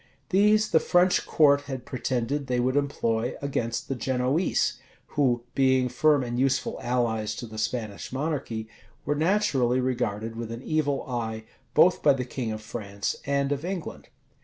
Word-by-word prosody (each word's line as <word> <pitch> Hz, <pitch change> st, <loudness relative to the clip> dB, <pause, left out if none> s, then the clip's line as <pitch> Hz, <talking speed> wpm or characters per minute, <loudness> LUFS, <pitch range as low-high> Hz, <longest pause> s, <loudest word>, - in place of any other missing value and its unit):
These 210 Hz, +3 st, +4 dB
the 160 Hz, -, +6 dB
French 180 Hz, +2 st, +3 dB
court 145 Hz, -2 st, +5 dB
had 130 Hz, -2 st, -5 dB
pretended 130 Hz, +2 st, -2 dB
they 125 Hz, -1 st, 0 dB
would 130 Hz, +2 st, +1 dB
employ 120 Hz, -5 st, 0 dB
against 120 Hz, -5 st, -2 dB
the -, -, -1 dB
Genoese, 130 Hz, +1 st, 0 dB, 0.3 s
who, 125 Hz, -5 st, +1 dB
being 130 Hz, -1 st, +3 dB
firm 145 Hz, +2 st, +3 dB
and 120 Hz, 0 st, -3 dB
useful 130 Hz, 0 st, 0 dB
allies 115 Hz, -3 st, 0 dB
to -, -, -6 dB
the 110 Hz, -1 st, -8 dB
Spanish 110 Hz, -2 st, -3 dB
monarchy, 130 Hz, -6 st, -3 dB, 0.4 s
were -, -, +1 dB
naturally 150 Hz, -, +2 dB
regarded 115 Hz, -3 st, -2 dB
with 115 Hz, 0 st, -5 dB
an 115 Hz, +2 st, -7 dB
evil 145 Hz, -3 st, 0 dB
eye, 110 Hz, -3 st, -3 dB, 0.3 s
both 180 Hz, +1 st, +5 dB
by 145 Hz, -, +5 dB
the 130 Hz, -2 st, -3 dB
king 120 Hz, -2 st, -4 dB
of 110 Hz, 0 st, -6 dB
France 100 Hz, -2 st, -4 dB
and 140 Hz, 0 st, +1 dB
of 145 Hz, +1 st, -1 dB
England. 180 Hz, -1 st, -5 dB
130 Hz, 160 wpm, -26 LUFS, 115-145 Hz, 0.4 s, the